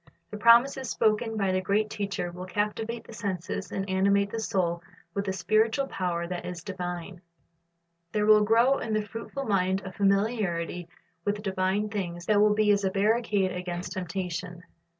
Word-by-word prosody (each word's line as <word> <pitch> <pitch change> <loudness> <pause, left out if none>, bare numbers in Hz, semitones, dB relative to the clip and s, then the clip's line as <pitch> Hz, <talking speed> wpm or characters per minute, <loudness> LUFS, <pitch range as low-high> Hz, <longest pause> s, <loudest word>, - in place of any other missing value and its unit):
The 210 - -5
promises 240 +4 +5
spoken 220 +1 +1
by 195 -2 +1
the 185 0 +1
great 210 +3 0
Teacher 200 -3 -3
will 180 +1 -8
captivate 220 +4 -2
the - - -12
senses 195 -2 -4
and 195 0 -3
animate 200 +1 +2
the 230 - -3
soul 175 -5 0 0.3
with 200 +1 -2
a - - +1
spiritual 220 +7 +2
power 180 -7 -2
that 175 0 -5
is 175 -2 -6
divine. 175 0 -5 0.9
There 210 -1 +1
will 215 0 +6
grow 235 +6 +4
in 220 - -3
the 215 - +1
fruitful 230 +6 -6
mind 190 -2 +1
a 190 - -5
familiarit}' 195 -4 0 0.4
with 205 +2 -2
divine 195 +1 0
things 175 -4 -4
that 205 +1 +4
will 210 0 +4
be 215 -1 +4
as 200 0 +2
a 190 - +2
barricade 205 -1 +1
against 180 0 -4
temptation. 180 -1 -4
200 Hz, 170 wpm, -27 LUFS, 180-215 Hz, 0.9 s, will